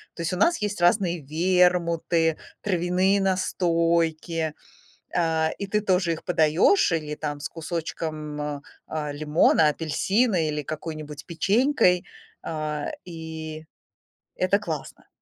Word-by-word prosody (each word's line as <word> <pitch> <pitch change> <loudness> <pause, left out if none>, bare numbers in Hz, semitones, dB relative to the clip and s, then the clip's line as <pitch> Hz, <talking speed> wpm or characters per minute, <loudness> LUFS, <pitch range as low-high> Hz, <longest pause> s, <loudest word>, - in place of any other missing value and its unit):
То 170 - -6
есть 165 - -1
у - - -2
нас 280 - +3
есть 205 -3 -2
разные 175 -2 +3
вермуты, 170 0 +2 0.3
травяные 185 +1 +2
настойки, 165 -3 +1 0.6
а, 160 -2 +2
и 200 - -4
ты 210 +2 0
тоже 185 -4 +2
их 160 - -8
подаёшь 175 - +3
или 155 -2 -2
там 150 -1 -4
с 145 - -5
кусочком, 155 -2 -5
м, 145 -1 -4 0.2
а, 150 -2 -3
лимона, 150 +1 +3
апельсина 170 +5 +1
или 150 0 -2
какой-нибудь 155 -1 -6
печенькой, 195 - +2 0.4
а, 155 -2 -3
и 160 -2 -7 0.7
это 190 +3 +2
классно. 160 -8 -6
165 Hz, 120 wpm, -25 LUFS, 155-180 Hz, 0.7 s, нас